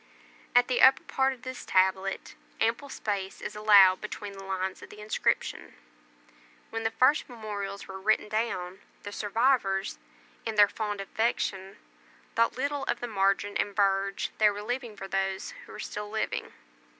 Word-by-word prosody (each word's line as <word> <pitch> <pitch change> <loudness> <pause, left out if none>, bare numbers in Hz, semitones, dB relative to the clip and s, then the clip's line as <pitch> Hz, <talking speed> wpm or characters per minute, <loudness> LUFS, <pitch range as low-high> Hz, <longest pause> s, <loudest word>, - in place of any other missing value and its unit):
At 245 0 +6
the 250 - +1
upper 265 0 +7
part 265 0 +1
of 255 -2 -10
this 255 0 -6
tablet 190 +1 +1 0.3
ample 230 +5 0
space 200 -6 -3
is 210 - -6
allowed 200 -3 +6
between 205 -1 -6
the 195 0 -10
lines 190 -1 -3
of - - -11
the 210 - -12
inscription; 210 +1 -1 1.0
when 225 - -3
the 225 - +1
first 255 +7 +3
memorials 205 -4 -6
were 190 0 -8
written 215 +1 +2
down, 200 -4 -2 0.2
the 205 - -6
survivors, 205 -2 +1 0.4
in 225 -1 -3
their 205 -1 +7
fond 205 -1 -3
affection, 195 -2 -2 0.6
thought 230 +1 +2
little 285 +1 -1
of - - -1
the - - -3
margin 200 -1 +1
and 205 - -1
verge 195 -1 +1
they 215 -1 +6
were 205 0 -5
leaving 240 -2 -4
for 195 - -6
those 195 - -2 0.2
who - - -12
were - - -9
still 210 0 -5
living. 220 0 -3
210 Hz, 160 wpm, -28 LUFS, 195-230 Hz, 1.0 s, upper